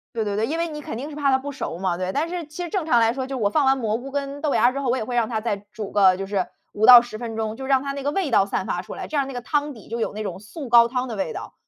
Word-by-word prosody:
对 225 - 0
对 205 -1 -2
对， 220 +2 +1
因 320 - -2
为 335 0 0
你 300 -1 -6
肯 225 - -6
定 285 +5 -5
是 295 - -9
怕 280 -2 +2
它 - - +6
不 285 +2 -6
熟 260 -11 -5
嘛， 180 -1 -1
对。 185 +1 -3
但 315 +4 -1
是 350 -1 -4
其 305 +4 -7
实 345 - -4
正 355 -3 -2
常 240 -6 +4
来 225 0 +3
说， 260 0 -4
就 270 -1 -4
是 235 - -3
我 200 - +2
放 285 +3 +2
完 270 0 +4
蘑 225 -3 -1
菇 270 +2 -9
跟 280 0 -3
豆 300 - +1
芽 235 - +4
儿 250 - +3
之 275 - -4
后， 270 -3 -2
我 250 - +2
也 - - -2
会 245 0 -4
让 230 -2 +2
它 220 -2 -2
再 215 -3 -1 0.2
煮 210 -2 -6
个 190 -3 +5
就 195 - -4
是 195 -2 -1 0.3
5 215 +1 +2
到 245 -1 +11
10 230 -3 -8
分 230 -2 -5
钟， 220 0 -3
就 265 0 -6
让 265 -1 +3
它 280 - -4
那 280 -1 -6
个 290 - 0
味 370 -8 -1
道 195 -3 +4
散 195 - -2
发 175 - -2
出 180 - -8
来。 - - -6
这 305 - -4
样 275 -1 +1
那 270 - -7
个 245 - -3
汤 295 +3 -1
底 220 - -14
就 230 +1 -4
有 225 - -1
那 215 - -5
种 190 -3 -5
素 245 +7 -9
高 235 0 +7
汤 250 +1 -2
的 225 - -5
味 190 -5 -2
道。 - - -8
245 Hz, 390 characters per minute, -23 LUFS, 215-280 Hz, 0.3 s, 到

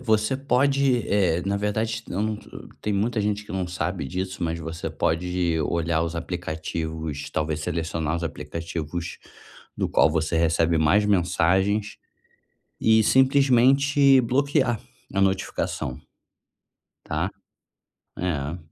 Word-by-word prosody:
você 110 0 +1
pode, 135 -2 +2
eh, 90 -4 +2
na 100 +1 0
verdade, 110 +3 -1
eu 100 - -2
não 110 0 -1
tô, - - -15
eh - - -11
Tem 105 - -1
muita 110 +3 0
gente 105 0 -1
que - - -9
não 95 -1 -1
sabe 90 -3 -3
disso, 95 +3 -4
mas 85 0 -1
você 80 +1 -5
pode 85 0 0
olhar 80 +1 0
os 85 0 -3
aplicativos, 80 -3 -4
talvez 75 0 -2
selecionar 80 -1 -2
os 85 - -3
aplicativos 80 +2 -5 0.6
do - - -1
qual - - +4
você 80 +1 0
recebe 80 0 +2
mais 95 +7 +4
mensagens 95 +2 +1 0.8
e 110 0 +5
simplesmente 135 +1 +5
bloquear 130 -1 +1 0.3
a 100 - +2
notificação. 95 -8 -1 1.1
Tá. - - -1 0.9
É. 80 -2 -2
90 Hz, 125 wpm, -24 LUFS, 80-110 Hz, 1.1 s, e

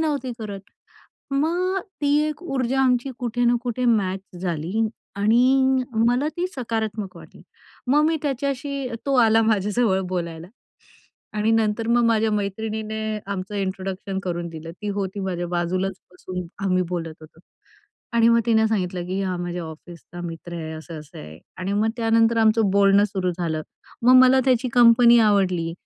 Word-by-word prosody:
नव्हती 285 -6 -1
करत. 205 -3 -6 0.7
मग 345 +7 0 0.2
ती 285 0 +3
एक 305 +3 -6
ऊर्जा 265 -5 -1
आमची 250 +1 +1
कुठे 245 0 -1
ना 240 0 +4
कुठे 250 0 -2
मॅच 195 -5 +1 0.2
झाली 180 +5 -1 0.3
आणि 255 +5 +3 0.2
मला 250 +5 +2
ती 355 +1 0
सकारात्मक 220 -5 -3
वाटली. - - -14 0.4
मग 285 +4 +4
मी 325 0 +1
त्याच्याशी 275 -1 -2 0.2
तो 275 - +1
आला 225 0 +4
माझ्या 210 -2 +1
जवळ 210 -6 +2
बोलायला 170 -2 -4 0.9
आणि 215 +1 +2
नंतर 225 0 +1
मग 240 0 +3
माझ्या 225 -1 +2
मैत्रिणीने 215 +2 -3 0.3
आमचं 195 0 -5
इंट्रोडक्शन 190 0 -3
करून 175 -1 -3
दिलं. 165 0 -8
ती 210 +4 -7
होती 200 -1 -3
माझ्या 180 -2 -3
बाजूलाच 185 +2 -1
बसून 180 0 -6 0.2
आम्ही 185 -1 +2
बोलत 165 -3 -4
होतो 155 +1 -16 0.7
आणि 230 -1 +4
मग 235 0 +5
तिने 220 -1 +4
सांगितलं, 180 -4 -2
की 190 +2 -2
हा 185 -2 -2
माझ्या 175 0 -4
ऑफिसचा 170 +2 -11
मित्र 165 +1 -8
आहे, 160 -1 -5
असं-असं 155 -1 -9
आहे 75 +1 -10 0.2
आणि 185 +2 -3
मग 215 +2 +2
त्यानंतर 225 0 +3
आमचं 220 -2 +3
बोलणं 200 +1 +5
सुरु 190 -3 -1
झालं. 160 -3 -2 0.4
मग 250 +2 +6
मला 260 +1 +5
त्याची 255 -1 +2
कंपनी 240 0 +7
आवडली, 185 -6 +2
210 Hz, 155 wpm, -23 LUFS, 185-240 Hz, 0.9 s, कंपनी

